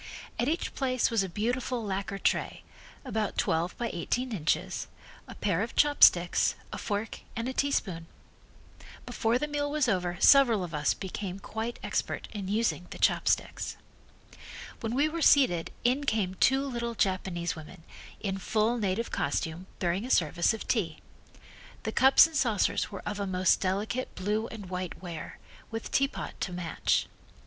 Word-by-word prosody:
At 240 - +1
each 325 +3 -1
place 255 -3 +1
was 225 -3 +3
a 190 - -2
beautiful 240 +5 -2
lacquer 195 -1 -3
tray, - - -1 0.4
about 215 -5 -2
twelve 165 +2 0
by 235 -1 -2
eighteen 250 +9 -2
inches, 180 -1 -1 0.4
a - - -10
pair 195 -3 0
of 225 - -4
chopsticks, 185 -12 +5 0.2
a - - -4
fork 205 +1 -3 0.2
and 230 +1 -2
a 260 - -2
teaspoon. 195 -13 -1 1.0
Before 225 +2 +1
the 300 - -2
meal 290 -1 -1
was 295 -2 +1
over 180 -4 0
several 240 -8 +6
of 170 -2 -6
us 150 -1 +1
became 190 -1 -5
quite 220 +4 -5
expert - - -2
in 200 -3 -4
using 210 -3 0
the - - -8
chopsticks. - - +1 1.0
When 230 0 -3
we 285 +3 +3
were 330 +2 -4
seated 215 - +4
in 260 +4 +2
came 210 -7 0
two 265 +8 +3
little 235 -3 -3
Japanese 185 -4 -1
women, 165 +2 -11 0.4
in 195 -2 -2
full 220 +5 +1
native 205 +2 -1
costume, 160 +5 -2
bearing 180 +3 0
a 250 - -6
service 170 - +3
of 225 - -5
tea. 170 -10 0 0.9
The - - -2
cups 265 +3 +7
and 325 -1 -6
saucers 235 -7 +1
were 195 - -7
of 210 0 -3
a 200 - -2
most 185 0 +2
delicate 205 +7 -2
blue 210 +4 -1
and 210 -4 -9
white 180 -1 -5
ware, 170 -3 -7 0.3
with 225 0 -5
teapot 275 +1 -1
to 185 - -2
match. 175 -2 0
210 Hz, 160 wpm, -29 LUFS, 180-245 Hz, 1.0 s, cups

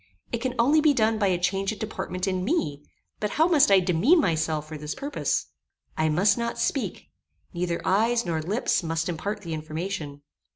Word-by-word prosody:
It 235 - -1
can 255 0 -2
only 285 +7 +4
be 300 -2 +4
done 220 -2 +2
by 200 - +2
a 185 -2 +2
change 195 +3 0
of 220 - -6
deportment 185 -3 -4
in 185 -1 -1
me; 155 - -1 0.4
but 210 - -1
how 320 +2 +5
must 320 -9 +5
I 195 -1 +7
demean 185 - +3
myself 160 - 0
for 155 - -7
this 150 0 -5
purpose? 285 +2 -2 0.5
I 155 0 +1
must 180 +9 +3
not 235 0 -2
speak. - - -2 0.4
Neither 175 -1 -2
eyes, 230 +5 +2
nor 160 -2 -1
lips, 205 +10 0
must 165 -1 -2
impart 200 +5 -3
the 170 -4 -5
information. 155 -1 -5
190 Hz, 190 wpm, -26 LUFS, 160-230 Hz, 0.5 s, I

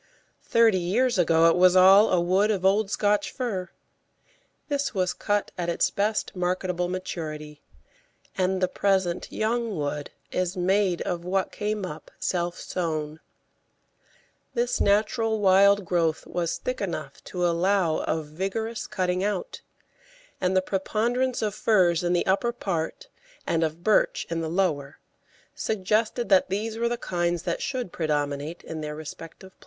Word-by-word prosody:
Thirty 225 -4 +3
years 215 +6 +1
ago 165 -1 +5
it 165 - +4
was 180 0 +5
all 195 +3 +7
a 180 - +3
wood 185 +5 +2
of 195 -4 0
old 200 +1 +3
Scotch 205 -1 +1
fir. 210 -8 -3 1.0
This 285 -5 -2
was 185 -2 +1
cut 205 -1 -1
at 175 -1 -1
its 170 - +1
best 210 +1 -1
marketable 180 0 -1
maturity, 155 -5 -5 0.7
and 185 0 0
the - - +4
present 190 -2 0
young 225 -2 -1
wood 145 0 -3 0.2
is 185 +1 -1
made 185 0 +1
of 175 -1 -3
what 190 +1 -1
came 210 -1 -2
up 155 -3 -8
self 175 -1 -2
sown. 155 -3 -3 1.4
This 240 +1 0
natural 220 +2 +2
wild 200 0 +5
growth 165 -2 0
was 170 -1 -2
thick 255 -3 -4
enough 155 -7 -5
to 180 -1 -2
allow 175 -1 +2
of 160 -1 -2
vigorous 195 +8 -4
cutting 180 0 -1
out, 210 - -3 0.8
and 185 0 +2
the 185 - +3
preponderance 235 +7 -1
of 210 -2 -1
firs 185 -5 +2
in 175 0 +1
the 175 - +1
upper 200 +5 +1
part 195 - -4 0.4
and 165 0 +1
of 160 +2 -3
birch 215 +1 +2
in 165 0 -1
the 160 - -3
lower 155 -6 -1 0.6
suggested 220 +3 0
that 190 -2 +4
these 215 +3 -2
were 235 0 +1
the 240 - -2
kinds 175 -5 -1
that 170 - -2
should 250 -9 -3
predominate 150 0 -2
in 160 -1 -6
their 150 0 -5
respective 165 +4 -10
places. - - -39
185 Hz, 150 wpm, -26 LUFS, 170-210 Hz, 1.4 s, all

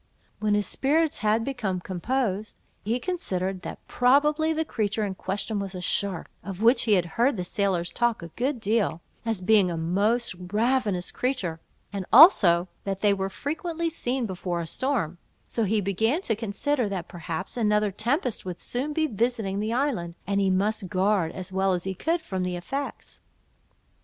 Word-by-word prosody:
When 210 -1 +2
his 205 0 +1
spirits 310 - +1
had 220 +1 +2
become 220 -9 -2
composed, 210 +3 -2 0.3
he 230 +4 0
considered, 190 - -2
that - - -8
probably 295 +5 +3
the 320 0 0
creature 215 -4 -1
in 195 - -3
question 200 +3 -2
was 195 -1 -4
a - - -4
shark, 185 -1 -1 0.2
of 195 -2 -6
which 235 +4 +4
he 220 - +4
had 180 -3 +3
heard 235 - +1
the 180 - -2
sailors 180 -2 0
talk 240 -5 0
a 170 - -7
good 250 - -2
deal, 210 -5 0 0.3
as 225 -5 -1
being 195 -1 +4
a 170 - -3
most 200 +9 +1 0.2
ravenous 215 -4 +1
creature, 205 -11 -2 0.3
and 195 -2 -4
also 190 - +8 0.2
that 195 -1 -3
they 205 -1 +4
were 195 -1 -2
frequently 325 - -3
seen 255 -5 -2
before 180 -3 -3
a 170 - -3
storm; 190 - -1 0.3
so 230 - -1
he 215 +2 +2
began 220 - 0
to 225 - +1
consider 225 +3 -1
that 190 -3 -4
perhaps 175 +1 -5
another 210 -3 +2
tempest 240 - 0
would 180 -2 -6
soon 270 +5 -3
be 315 +1 +1
visiting 225 -5 -1
the 215 +2 -1
island, 230 -10 -1
and 200 +1 +1
he 195 - +2
must 195 +1 0
guard, 190 -3 +2
as 185 0 -7
well 190 0 +2
as 175 -1 -1
he 190 - -2
could, 330 - -1
from 190 -8 -3
the 180 0 -1
effects. 270 +11 -5
210 Hz, 175 wpm, -26 LUFS, 185-245 Hz, 0.3 s, also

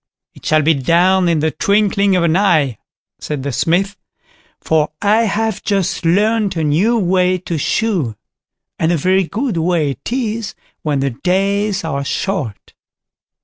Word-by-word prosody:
"It - - -11
shall 155 -1 +3
be 160 +2 +4
done 175 +6 +2
in 160 -3 +1
the 160 0 +1
twinkling 200 0 +2
of 180 - +2
an 165 -1 +2
eye", 155 - +2 0.4
said 145 -3 -4
the 140 - -2
Smith, 185 - 0 0.6
"for 155 -1 +1
I 215 +3 +3
have 220 -1 -1
just 195 -4 -1
learnt 205 +3 +2
a 165 - -1
new 180 +11 +2
way 185 -2 +2
to 170 -3 -4
shoe; 175 - -1 0.6
and 165 +1 +1
a 170 - +2
very 185 +4 +2
good 220 +2 -3
way 165 -3 +1
it 135 - -8
is 230 -4 -3 0.3
when 145 -3 -1
the 135 0 0
days 195 - 0
are 140 -4 -2
short." 140 - -4
180 Hz, 155 wpm, -17 LUFS, 155-200 Hz, 0.6 s, be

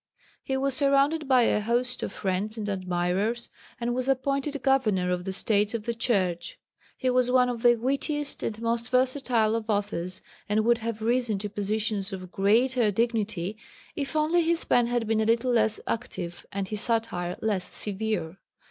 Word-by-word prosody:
He 265 - -2
was 275 0 0
surrounded 280 +3 +2
by 255 -2 +5
a 210 - +2
host 240 +3 0
of - - -3
friends 200 +3 -2
and 210 -1 -3
admirers, 190 +4 -1 0.3
and 240 0 -1
was 255 +1 -1
appointed 275 +2 0
Governor 215 -10 +2
of 180 0 -2
the 190 - -2
States 205 +2 +1
of 225 - -3
the 235 - -2
Church. 185 -8 -1 0.4
He 255 - +1
was 250 0 +2
one 250 0 +4
of 240 -2 -4
the 240 0 +6
wittiest 280 +4 -1
and 220 -1 -3
most 235 +1 0
versatile 255 -4 +2
of 225 -1 -4
authors, 200 -3 -2 0.3
and 215 +1 +2
would 235 0 +4
have 225 -1 -4
risen 235 -2 +1
to 205 +1 -4
positions 210 0 -1
of 185 -2 -7
greater 230 +4 +3
dignity, 215 -3 -1 0.4
if 280 +2 -4
only 310 +3 +3
his 335 0 +1
pen 240 -1 +3
had 240 -1 0
been 220 0 +1
a - - +1
little 230 +3 +2
less 220 -2 +2
active 175 -6 -5
and 195 -1 -3
his 215 -1 -3
satire 225 -7 -1
less 210 -4 -2
severe. 200 -4 -3
225 Hz, 175 wpm, -27 LUFS, 205-250 Hz, 0.4 s, the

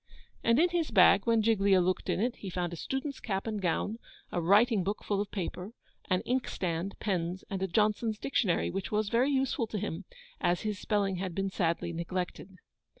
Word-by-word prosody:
And 230 +1 +4
in 350 +2 +5
his 340 -2 0
bag, 195 0 +5
when 230 -1 +4
Giglio 200 -3 +4
looked 180 0 0
in - - +1
it, 240 +3 0
he 195 - -6
found 175 -1 -2
a - - -3
student's 270 - -4
cap 195 -3 -3
and 215 -2 -3
gown, 205 +5 -1 0.3
a 175 - -1
writing 205 +4 +4
book 205 +3 -3
full 200 -1 0
of 205 - -4
paper, 190 +2 -5 0.4
an 185 -1 +2
inkstand, 195 -7 -2
pens, 180 -2 -2
and 195 -1 -2
a 190 - +1
Johnson's 215 +3 +1
dictionary, 215 -7 0
which 195 -1 -4
was 210 -1 +1
very 245 +5 +3
useful 265 -3 0
to 215 - -4
him, 185 -1 -4 0.3
as 175 0 +1
his 210 -3 -3
spelling 200 -3 0
had 180 -2 -4
been 195 0 -1
sadly 170 -2 -1
neglected. 180 +2 -4
200 Hz, 195 wpm, -30 LUFS, 180-225 Hz, 0.4 s, in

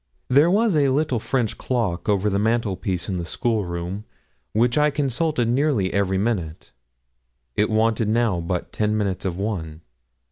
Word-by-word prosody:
There 145 +6 +5
was 210 0 +3
a 145 -2 +3
little 135 -2 +1
French 120 -1 -1
clock 110 -8 -1
over 100 0 +2
the 100 -1 +1
mantelpiece 105 -5 -1
in 95 - -2
the 85 - -3
school 110 +3 -1
room, 85 +4 -5 0.5
which 120 +3 +2
I 150 0 +4
consulted 145 -2 0
nearly 125 -6 +1
every 95 -1 +1
minute. 95 - -2 0.8
It 105 - +2
wanted 110 0 +2
now 110 -5 +2
but 90 +1 -3
ten 105 0 0
minutes 100 -3 -2
of 90 -2 -2
one. 85 -6 -4
110 Hz, 155 wpm, -23 LUFS, 95-125 Hz, 0.8 s, There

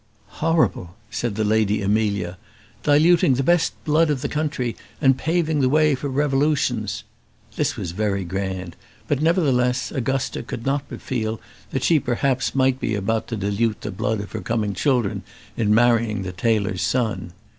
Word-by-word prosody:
"Horrible!" 155 - +1 0.2
said 110 0 -2
the 110 - 0
Lady 105 -1 +2
Amelia; 100 -3 0 0.4
"diluting 150 -1 +4
the 135 - 0
best 175 +2 +3
blood 155 +1 +3
of 140 -4 0
the - - 0
country, 145 -6 -2 0.2
and 135 -3 +4
paving 160 -1 0
the 130 - +3
way 155 +1 +4
for 140 +2 -3
revolutions." 135 -5 0 0.5
This - - 0
was 85 - -4
very 100 0 -1
grand; 95 -1 -4 0.3
but, 145 -1 0
nevertheless, 130 -7 +2
Augusta 135 -1 -1
could 115 - -7
not 140 +1 0
but - - -8
feel 110 -4 -2 0.3
that 135 - -2
she 165 -3 +4
perhaps 130 +2 0
might 130 -1 +2
be 110 - -1
about 110 +3 -1
to 115 - -3
dilute 105 +2 -1
the - - -4
blood 110 +2 -1
of 100 - -9
her 110 - -4
coming 105 0 -1
children 120 -1 0 0.3
in 105 -2 +1
marrying 115 -3 +3
the 95 - -4
tailor's 100 -1 0
son. 115 -8 -1
120 Hz, 165 wpm, -22 LUFS, 105-140 Hz, 0.5 s, diluting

